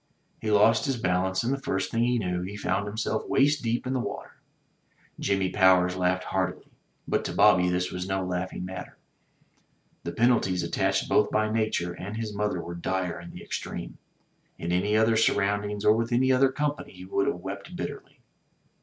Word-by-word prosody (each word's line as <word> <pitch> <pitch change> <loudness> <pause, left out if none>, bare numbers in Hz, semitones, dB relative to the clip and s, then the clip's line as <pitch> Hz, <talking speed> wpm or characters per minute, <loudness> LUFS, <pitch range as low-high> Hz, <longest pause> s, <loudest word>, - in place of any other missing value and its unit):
He 110 - -3
lost 105 +4 +4
his 135 -2 0
balance, 95 -1 0
and 125 +3 0
the 140 - -4
first 95 -5 -2
thing 115 +1 +1
he 125 0 +2
knew, 90 -5 -1
he 100 +3 -6
found 100 +1 -1
himself 110 +1 -2
waist 145 +1 +3
deep 120 +1 -1
in 130 - -1
the 130 - 0
water. - - -5 0.9
Jimmy 95 -2 0
Powers 90 -2 +4
laughed 90 0 +1
heartily; 95 -1 -3 0.4
but - - 0
to - - -2
Bobby 90 0 +5
this 90 0 -1
was 90 +1 -4
no 95 -1 -1
laughing 90 0 -3
matter. 90 -1 -8 1.1
The - - -3
penalties 110 -7 +2
attached 95 +3 0
both 105 - +3
by 110 0 +1
nature, 110 -6 0
and 100 +5 -6
his 110 -2 -4
mother 105 -2 -1
were 85 - -6
dire 90 0 -2
in 85 0 -10
the - - -10
extreme. - - -6 0.6
In 85 - -3
any 100 +4 +2
other 110 +1 +4
surroundings 105 -1 +1
or 105 - +7
with 115 +2 -1
any 130 +2 +3
other 130 +1 +4
company 145 +1 -3
he 90 0 -11
would 100 +1 0
have - - +1
wept 95 +2 -7
bitterly. - - -7
100 Hz, 185 wpm, -27 LUFS, 90-115 Hz, 1.1 s, or